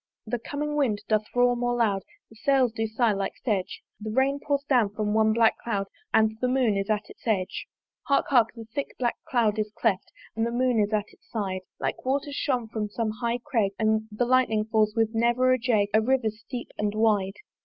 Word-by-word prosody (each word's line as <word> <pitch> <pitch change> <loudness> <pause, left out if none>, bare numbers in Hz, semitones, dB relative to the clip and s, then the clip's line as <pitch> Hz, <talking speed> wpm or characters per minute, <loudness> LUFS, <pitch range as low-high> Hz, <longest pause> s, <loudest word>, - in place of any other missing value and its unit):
The 235 +2 -2
coming 295 +5 -3
wind 225 -8 +1
doth 215 -1 +2
roar 245 0 +4
more 245 0 0
loud; 210 -5 +1 0.3
The - - -15
sails 260 0 +2
do 225 0 -2
sigh, 225 +1 +2
like 195 -1 -3
sedge: 200 -6 -2 0.2
The 215 0 -5
rain 265 +5 +1
pours 280 -1 -1
down 245 -7 +3
from 210 0 -2
one 220 0 +4
black 225 0 +3
cloud 200 -4 -2 0.3
And 220 0 +3
the 250 - +2
Moon 250 -4 +2
is 195 +1 -2
at 210 -1 0
its - - -15
edge. 190 -5 -1 0.4
Hark! 280 - +3
hark! 240 -5 +5
the 230 -1 -8
thick 280 -1 -4
black 240 -2 0
cloud 225 -4 +2
is 215 0 -1
cleft, 200 -5 0 0.2
And 225 - 0
the 230 - +1
Moon 245 -1 +2
is 205 0 +1
at 210 -1 +1
its - - -26
side: 195 -4 -3 0.2
Like - - -3
waters 280 +2 -1
shot 250 -6 -1
from 215 -2 -2
some 220 +1 -2
high 235 0 0
crag, 225 -9 +1
The 220 +1 0
lightning 240 -4 +2
falls 215 -1 +1
with 225 0 +1
never 240 +3 +3
a 255 - +1
jag 220 -4 +2
A 220 - +5
river 245 -1 +1
steep 240 +3 -8
and 210 0 0
wide. 210 -3 +2
225 Hz, 210 wpm, -26 LUFS, 215-250 Hz, 0.4 s, hark